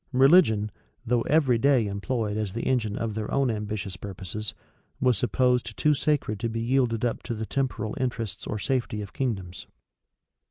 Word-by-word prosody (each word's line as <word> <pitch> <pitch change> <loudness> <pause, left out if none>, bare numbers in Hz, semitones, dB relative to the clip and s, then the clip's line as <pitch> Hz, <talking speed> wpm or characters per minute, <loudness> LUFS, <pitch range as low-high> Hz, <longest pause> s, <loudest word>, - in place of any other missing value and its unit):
[v] 125 - -3
Religion, 130 - +5 0.3
though 120 0 +2
every 140 -6 +4
day 135 -3 +4
employed 105 +1 -2
as 105 -3 -2
the 115 - -3
engine 110 -5 0
of 115 -2 -2
their 110 0 -4
own 135 -3 +2
ambitious 105 -3 -4
purposes, 100 +1 -6 0.4
was 125 -2 +3
supposed 125 -2 +1
too 150 - +4
sacred 140 -7 0
to 115 - -1
be 115 0 -3
yielded 120 -1 +1
up 120 - -1
to 120 - -4
the 110 0 -3
temporal 120 -5 -2
interests 115 -6 -3
or 105 - -2
safety 115 -3 -1
of 100 - -10
kingdoms. 95 -9 -3
115 Hz, 170 wpm, -26 LUFS, 105-130 Hz, 0.4 s, Religion